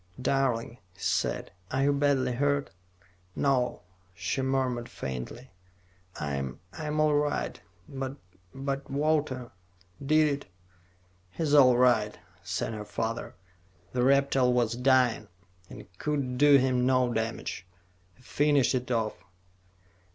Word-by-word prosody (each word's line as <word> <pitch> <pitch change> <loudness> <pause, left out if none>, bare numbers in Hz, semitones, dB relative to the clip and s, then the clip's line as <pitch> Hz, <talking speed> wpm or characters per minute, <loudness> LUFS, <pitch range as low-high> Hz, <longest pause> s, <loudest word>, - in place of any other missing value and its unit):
"Darling," 125 -3 0 0.2
he - - -23
said, - - -1 0.2
"are 130 +1 0
you 145 +1 +3
badly 140 -2 +2
hurt?" 140 +3 0 0.6
"No," 130 -7 0 0.3
she 135 +9 -2
murmured 130 -3 -1
faintly. 70 - -6 0.7
"I'm 70 -3 -3
I'm 155 -1 -3
all 155 -1 +4
right. 145 0 -1 0.3
But 135 -1 -5 0.4
but 135 0 -4
Walter 145 -3 0 0.5
did 155 +2 +4
it 140 -1 -2 0.5
" 90 0 -36
"He's 155 -3 0
all 130 -4 +7
right," 120 -4 +3 0.2
said - - -3
her 105 -1 -5
father. 115 +2 -4 0.6
"The 125 - 0
reptile 135 -1 +3
was 120 -2 +1
dying, 125 -3 +3 0.4
and - - -10
could 135 -4 -2
do 145 -1 +7
him 130 -1 +2
no 130 -1 +2
damage. 110 -5 -3 0.5
We 125 - -23
finished 145 0 +2
it 125 -1 -2
off." 115 -3 -1
130 Hz, 120 wpm, -28 LUFS, 120-140 Hz, 0.7 s, all